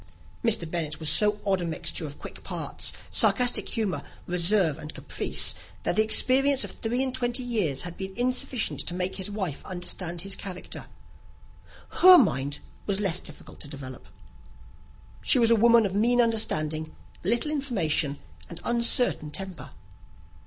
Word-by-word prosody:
Mr. 225 -7 +2
Bennet 160 -2 -4
was 155 -2 +1
so 210 +7 +3
odd 190 -2 +1
a - - -3
mixture 160 -1 -3
of 145 - -11
quick - - -11
parts, - - -3 0.2
sarcastic 250 -1 +2
humour, 215 -5 -2 0.2
reserve, 175 -2 +1
and 155 0 -9
caprice, - - 0 0.3
that - - 0
the 215 - +4
experience 260 +5 +5
of - - -5
three 240 +3 -1
and 260 -1 -2
twenty 245 0 -1
years 210 - -1
had 175 -1 -7
been 190 0 -6
insufficient 255 0 -1
to 175 - -1
make 180 +1 -1
his 190 +1 -2
wife 190 -8 -4
understand 175 -1 -2
his 195 +1 -2
character. 185 -2 -8 1.1
Her 370 0 +10
mind 140 - +1 0.3
was 200 -1 +1
less 185 -4 0
difficult 155 - -12
to - - -7
develope. 135 -3 -10 1.1
She - - +3
was 235 -2 +4
a - - +6
woman 230 0 +5
of 190 - -3
mean 235 +4 +2
understanding, 155 -9 +1 0.3
little 235 - +1
information, 175 - -1 0.3
and 170 - -8
uncertain 235 - +2
temper. 190 +3 -8
195 Hz, 150 wpm, -26 LUFS, 165-235 Hz, 1.1 s, Her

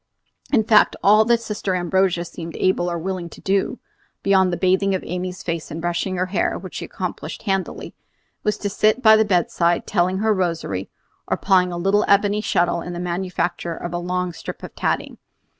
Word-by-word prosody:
In 235 -6 +4
fact, 215 -1 +5
all 215 +2 +6
that 235 0 +3
Sister 205 -4 -2
Ambrogia 180 0 +1
seemed 165 -1 -8
able 185 -1 +1
or 170 - -2
willing 180 0 -4
to - - -13
do, 195 0 0 0.5
beyond 190 -2 +4
the 175 - -1
bathing 190 +1 +2
of 185 - -4
Amy's 180 +1 -5
face 165 -2 -3
and 160 - -6
brushing 175 +2 -1
her 180 0 0
hair, 185 +2 -1
which - - -9
she - - -5
accomplished - - -6
handily, 195 -2 -2 0.5
was 210 -1 0
to 205 - -3
sit 215 +4 +2
by 220 -1 +8
the 220 - +4
bedside 175 -3 +1
telling 185 -1 +1
her 215 +2 +2
rosary, 165 - -2 0.4
or - - 0
plying 185 -2 +3
a 175 - -4
little 195 +4 +2
ebony 205 +1 +3
shuttle 175 -4 +1
in 175 - -6
the 175 - -5
manufacture 175 -1 -2
of 175 +1 -6
a 175 - -1
long 180 0 -2
strip - - -8
of - - -8
tatting. - - -2
185 Hz, 190 wpm, -22 LUFS, 175-200 Hz, 0.5 s, by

